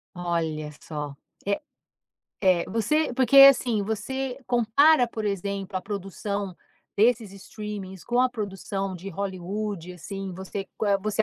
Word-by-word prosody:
Olha 165 -3 -2
só. 150 -2 -5 0.3
É 200 0 0 0.8
é 185 -3 +4
você 245 +8 +1
porque 265 +2 +3
assim, 255 -5 +8
você 250 +5 -3
compara, 245 +4 +5
por 220 -2 -5
exemplo, 200 -1 -2
a - - -1
produção 200 0 -4 0.4
desses 220 -1 +3
streamings 195 -2 -7
com 245 +1 +2
a 255 - +4
produção 195 -4 -4
de 185 +2 -7
Hollywood 195 -1 -4
assim. 195 +2 -6
Você 190 +2 -6
qual 210 - 0
é 200 - +3
você, 215 +2 0
200 Hz, 135 wpm, -26 LUFS, 190-225 Hz, 0.8 s, assim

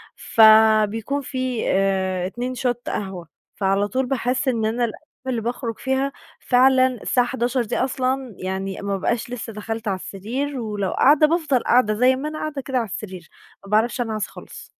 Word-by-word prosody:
فبيكون 220 +3 +4
في 255 -3 -3
آآ 190 -1 +1
اتنين 245 +6 -4
Shot 245 0 0
قهوة 190 -4 -4 0.3
فعلى 195 +1 +1
طول 260 +4 -1
باحس 255 +1 -1
إن 230 -4 +1
أنا 235 +2 +1
الأيّام 225 - -7 0.3
اللي 245 -3 -1
باخرج 235 0 -4
فيها 265 +1 0 0.3
فعلًا 260 +1 +4
الساعة 245 0 0
23:00 245 0 0
دي 215 - -3
أصلًا 260 -2 -1
يعني 190 +1 -4
ما 200 0 -2
ابقاش 235 +5 -1
لسّه 230 -2 -5
دَخلت 225 +1 -5
علي 195 - +1
السرير، 250 +10 -4
ولو 210 -4 -2
قاعدة 300 +2 +5
بافضل 305 -6 +1
قاعدة 235 -3 +3
زي 250 +4 +4
ما 280 +4 -4
أنا 310 0 -6
قاعدة 300 -3 -4
كده 265 0 -2
علي 230 -3 0
السرير، 185 -3 -7 0.4
ما 195 - -11
باعرفش 230 +4 +2
أنعَس 220 -3 -2
خالص. - - -11
235 Hz, 170 wpm, -22 LUFS, 210-260 Hz, 0.4 s, قاعدة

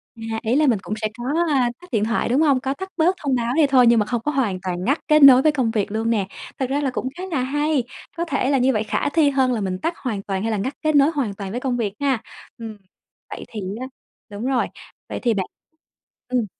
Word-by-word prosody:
À, 225 -1 -4
ý 230 +2 +1
là 300 +1 +3
mình 230 -6 +3
cũng 215 - -4
sẽ 215 - +1
có, 240 - -7 0.3
à, 260 -4 +2
tắt 360 - -14
điện 220 -4 +1
thoại, 230 +1 0
đúng 260 +5 +3
hông? 280 -5 +3
Có 270 +1 -2
tắt 380 +5 -7
bớt 345 +4 +3
thông 270 -2 +1
báo 235 0 -1
đi 310 -2 +4
thôi 255 -3 +5
nhưng 235 -1 +5
mà 210 - +1
không 235 +1 -2
có 295 - -1
hoàn 225 -10 0
toàn 180 -1 -3
ngắt 280 - +1
kết 305 -2 +5
nối 260 -2 +9
với 310 - +4
công 260 -6 0
việc 210 -3 -1
luôn 225 +2 -1
nè. 205 -4 0 0.3
Thật 260 - -1
ra 280 +2 0
là 280 - 0
cũng 255 0 -3
khá 365 - -6
là 310 - 0
hay, 295 +1 0 0.3
có 340 - -1
thể 275 -4 -1
là 280 - +3
như 260 0 +3
vậy 215 - 0
khả 220 - -1
thi 305 -2 +3
hơn 265 -2 +2
là 225 - -2
mình 185 -1 -2
tắt 330 - -1
hoàn 220 -7 -3
toàn 195 -1 -3
hay 225 - -1
là 215 - 0
ngắt 255 +8 -2
kết 310 -1 +2
nối 285 +3 +5
hoàn 265 -10 -2
toàn 195 -1 -7
với 245 - -3
công 255 -2 -1
việc 210 -4 -2
ha. 270 -5 0 0.4
Ừm, 225 -2 -8 0.5
vậy - - -7
thì 215 - -6 0.2
á 260 - -4 0.4
đúng 205 +3 -6
rồi. 260 -2 +1 0.4
Vậy - - -4
thì 240 -2 +2
bạn 190 -3 -1 0.8
ừm. 250 -2 0
250 Hz, 270 wpm, -22 LUFS, 220-280 Hz, 0.8 s, nối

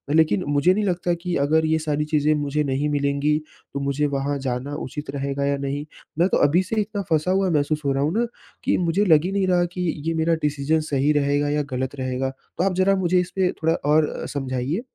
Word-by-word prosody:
लेकिन 160 +3 +3
मुझे 145 +5 +3
नहीं 210 +1 0
लगता 175 -1 0
कि 180 -1 -2
अगर 160 +1 +3
ये 160 0 +2
सारी 150 -1 -1
चीज़ें 150 0 +2
मुझे 150 +2 0
नहीं 140 +2 -1
मिलेंगी, 140 +1 +1 0.4
तो 140 - -2
मुझे 140 +1 0
वहाँ 140 0 -1
जाना 130 +2 -3
उचित 150 0 -6
रहेगा 140 0 -2
या 140 0 +1
नहीं? 140 +2 -3 0.3
मैं 175 - +5
तो - - +2
अभी 175 +6 +2
से 190 - -4
इतना 205 0 -3
फँसा 160 +3 +2
हुआ 190 -1 +2
महसूस 150 -1 0
हो 140 - +2
रहा 135 +1 0
हूँ 155 - +1
ना, 235 +2 +1 0.4
कि - - +2
मुझे 180 +4 +1
लग 160 -3 +5
ही 190 - -1
नहीं 195 -1 +1
रहा 175 -1 +3
कि 180 - -4 0.3
ये 165 - +1
मेरा 165 +1 +1
डिसीज़न 150 +2 +1
सही 140 +2 +2
रहेगा 145 0 +1
या 150 0 +1
गलत 130 +2 -3
रहेगा। 130 0 -2 0.3
तो 180 - +1
आप 195 -1 +1
ज़रा 190 +2 +3
मुझे 185 -1 +2
इस 180 0 -2
पे 185 -1 +2
थोड़ा 160 +1 +3 0.2
और 155 0 +4
अ, - - -4
समझाइए। 135 - -2
150 Hz, 230 wpm, -23 LUFS, 140-175 Hz, 0.4 s, मैं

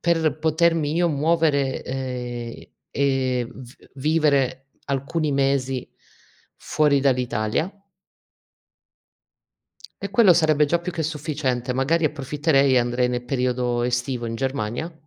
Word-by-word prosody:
per 160 -3 +1
potermi 160 -1 +1
io 175 +1 +2
muovere, 150 -2 +1
ehm, 125 -2 -5 0.3
e 130 -3 0
v 125 0 -12 0.2
vivere 140 -2 +1 0.2
alcuni 140 +3 -1
mesi 135 -2 0 0.7
fuori 145 -2 +1
dall'Italia 125 - 0 2.3
e 200 - -4
quello 200 -3 +6
sarebbe 155 -2 +3
già 170 +4 +1
più 175 +1 -5
che 165 - -2
sufficiente, 145 -5 -2
magari 150 +6 +1
approfitterei 140 -1 +1
e - - +5
andrei 120 +1 +1
ne 125 0 -2
periodo 125 -1 -1
estivo 120 0 -1
in 115 - -4
Germania 130 +4 -3
135 Hz, 110 wpm, -23 LUFS, 125-155 Hz, 2.3 s, quello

